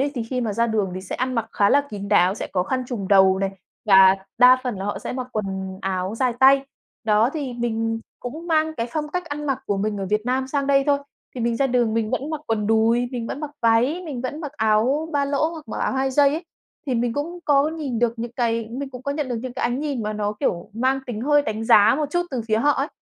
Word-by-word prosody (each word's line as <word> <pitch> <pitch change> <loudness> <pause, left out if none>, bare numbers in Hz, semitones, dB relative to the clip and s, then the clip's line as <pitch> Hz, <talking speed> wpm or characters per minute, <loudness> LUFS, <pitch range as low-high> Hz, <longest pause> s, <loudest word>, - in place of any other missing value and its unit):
ấy 280 +1 +1
thì 240 - -2
khi 250 +2 -3
mà 220 -3 -1
ra 230 +3 +1
đường 215 -4 0
thì 185 - -5
sẽ 185 - -6
ăn 255 0 -1
mặc 225 -1 -1
khá 200 -1 +3
là 285 - +5
kín 200 -1 -6
đáo, 185 -1 +4
sẽ - - -5
có 180 -2 +1
khăn 255 +5 -2
trùm 210 -7 -4
đầu 190 -1 +5
này 195 0 -1 0.3
và 190 -2 +7 0.2
đa 255 +1 +7
phần 245 -5 -3
là 195 - -4
họ 205 -1 -2
sẽ - - -5
mặc 255 -1 -4
quần 190 -2 -4
áo 190 +1 -2
dài 250 +1 +1
tay. 270 +1 +6 0.4
Đó, 220 +3 +3
thì 285 -6 -4
mình 225 -1 -2 0.2
cũng 315 +8 -7
mang 315 -1 +1
cái 230 -3 -2
phong 300 -1 -2
cách 360 +2 -3
ăn 295 -1 -5
mặc 270 -2 0
của 200 - 0
mình 205 +1 -1
ở 195 - -3
Việt 210 0 +2
Nam 260 +1 0
sang 280 0 -1
đây 275 -1 +3
thôi, 285 -1 +3 0.4
thì 245 - -5
mình 235 0 0
ra 275 - +2
đường 240 -3 +1
mình 225 -1 0
vẫn 275 +4 -2
mặc 310 -2 -3
quần 215 -2 -1
đùi, 225 +2 +2
mình 235 -2 -3
vẫn 290 - -5
mặc 300 - -5
váy, 245 +10 +2
mình 275 -7 -5
vẫn 290 +5 -4
mặc 295 -3 -6
áo 255 +6 +1
ba 285 -1 +1
lỗ 285 +3 +1
hoặc 320 -2 -10
mặc - - -5
áo - - 0
hai 265 0 0
dây 285 +1 +5
ấy. 320 +4 -3 0.4
Thì 260 - 0
mình 235 0 0
cũng 325 +6 -4
có 285 0 +3
nhìn 295 -7 -4
được 235 -1 +2
những 235 +1 -5
cái 230 -2 -1
mình 270 +2 -5
cũng 250 0 -9
có 280 - -2
nhận 290 -2 -3
được 245 - -2
những 255 -1 -5
cái 260 - -5
ánh 245 +3 0
nhìn 280 -6 -2
mà 215 0 -2
nó, 210 0 -2
kiểu, 170 +4 -1
mang 260 +5 0
tính 225 -3 -4
hơi 290 +2 +3
đánh 220 -1 -3
giá 220 -2 +6
một 300 -1 -1
chút 350 +2 +1
từ 250 -4 -2
phía 215 - +2
họ 290 +5 +3
ấy, 275 +2 -1
245 Hz, 275 wpm, -23 LUFS, 215-280 Hz, 0.4 s, và